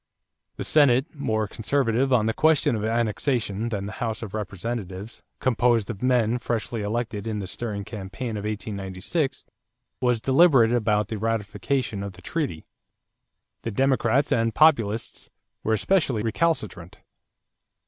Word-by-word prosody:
The - - -4
Senate, 140 0 +3
more 110 -7 -1
conservative 130 +3 0
on 120 -4 +4
the 110 - +1
question 155 -5 +3
of 105 - -3
annexation 115 -1 0
than 100 -3 -3
the 100 - -5
House 115 -1 -2
of 105 - -7
Representatives 105 0 -5 0.2
composed 120 -4 +2
of 105 - -9
men 125 -2 +2
freshly 115 -1 -2
elected 110 0 -3
in 110 -1 -2
the 100 - -4
stirring 100 +1 -4
campaign 110 +3 -6
of 100 - -4
1896, 105 - -3 0.5
was 125 -2 +2
deliberate 135 -2 +5
about 105 -3 +1
ratification 110 +1 -1
of 100 -1 -5
the 90 0 -16
treaty. 145 - -3 1.0
The - - -3
Democrats 130 +3 +2
and 115 -1 +1
Populists 115 -9 +2 0.3
were 110 - +1
especially 130 - +1
recalcitrant. 110 - -1
115 Hz, 130 wpm, -25 LUFS, 105-125 Hz, 1.0 s, deliberate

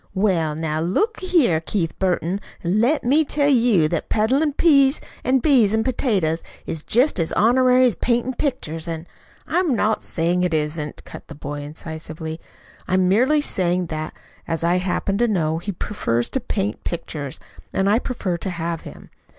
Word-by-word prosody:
"Well, 175 -6 +1
now 155 -1 -2
look 410 - 0
a 370 - -5
here, 260 - +3
Keith 165 0 -2
Burton, 185 +1 0 0.2
let 225 - +2
me 285 +6 +4
tell 285 -1 +1
you 230 - +4
that 170 - -3
peddlin' 265 +8 +2
peas 275 -3 +4 0.2
an' 260 +1 +3
beans 235 -7 +4
an' 220 - +1
potatoes 200 - 0 0.2
is 160 - -4
jest 245 - +2
as 165 - -1
honorary 255 +3 +4
as 245 - +3
paintin' 240 +5 0
pictures, 170 - -3
an' 165 0 -4 0.3
" - - -30
"I'm 350 -7 +2
not 215 0 +1
saying 175 +2 0
it 180 -3 +1
isn't," 150 0 -3
cut - - -9
in - - -40
the 150 - -10
boy 145 0 -6
incisively. 160 +1 -7 0.5
"I'm 185 0 +2
merely 255 +10 +3
saying 180 -8 0
that, 155 0 -5 0.3
as 165 -1 -2
I 175 +2 +3
happen 195 +2 -1
to 240 - +3
know, 165 -6 0
he 200 +4 -4
prefers 120 - -2
to 265 - -1
paint 205 -3 -3
pictures 150 -5 -5 0.3
and 195 - 0
I 210 +3 +4
prefer 210 -9 -3
to 190 - -4
have 170 -2 -3
him. - - -12
190 Hz, 175 wpm, -22 LUFS, 165-250 Hz, 0.5 s, me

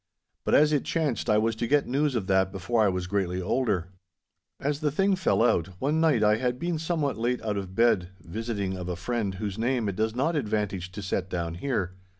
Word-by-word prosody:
But - - +3
as 150 +1 +5
it 145 - +2
chanced, 155 -7 -1
I 105 - +5
was 110 +1 +1
to 120 - -1
get 145 +2 +3
news 140 +2 0
of 110 -5 -1
that 95 0 +2
before 100 +5 0
I 105 - +4
was 90 -1 -2
greatly 90 -1 -1
older. 95 -3 0 0.7
As 145 +1 -1
the 155 -1 +1
thing 195 +7 +2
fell 185 -10 +2
out, 90 -5 +1
one 150 +4 +1
night 150 -9 +3
I 105 0 +4
had 125 +1 -1
been 170 +3 -2
somewhat 155 -6 -1
late 120 +2 0
out 105 -2 -1
of 95 -2 -5
bed, 105 -6 +3
visiting 100 0 -3
of 90 -1 -5
a 90 - -2
friend 100 +1 -2
whose 100 +1 -4
name 120 -1 +1
it 100 - -2
does 110 +2 -1
not 140 +7 +1
advantage 105 - -2
to 100 +1 -6
set 95 0 -2
down 85 -3 -2
here. 95 -2 -2
110 Hz, 220 wpm, -27 LUFS, 95-135 Hz, 0.7 s, as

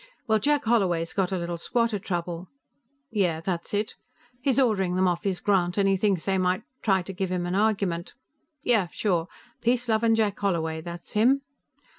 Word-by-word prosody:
Well, 220 -3 +3
Jack 290 +5 +1
Holloway's 185 -8 +1
got 190 -2 0
a 190 - 0
little 170 -1 -3
squatter 230 +2 0
trouble. 175 -2 -4 0.6
Yeah; 180 -7 +1
that's 170 0 -3
it. 210 +1 -1 0.5
He's 270 0 +2
ordering 195 -8 +2
them 185 0 +3
off 175 -1 0
his 190 -2 0
grant, 180 -3 +1
and 200 -1 +3
he 195 - +4
thinks 195 -3 +1
they 190 -1 +1
might 185 0 +1 0.2
try 190 -4 +2
to 195 - -7
give 190 0 -2
him 180 -1 -1
an 175 - -2
argument. 195 -4 0 0.5
Yeah, 220 -8 +3
sure, 175 -2 0 0.3
Peace 245 +1 +1
Lovin' 225 0 +3
Jack 215 -3 0
Holloway, 160 -5 -1
that's 170 +1 -8
him. 255 +6 +3
195 Hz, 180 wpm, -26 LUFS, 175-220 Hz, 0.6 s, he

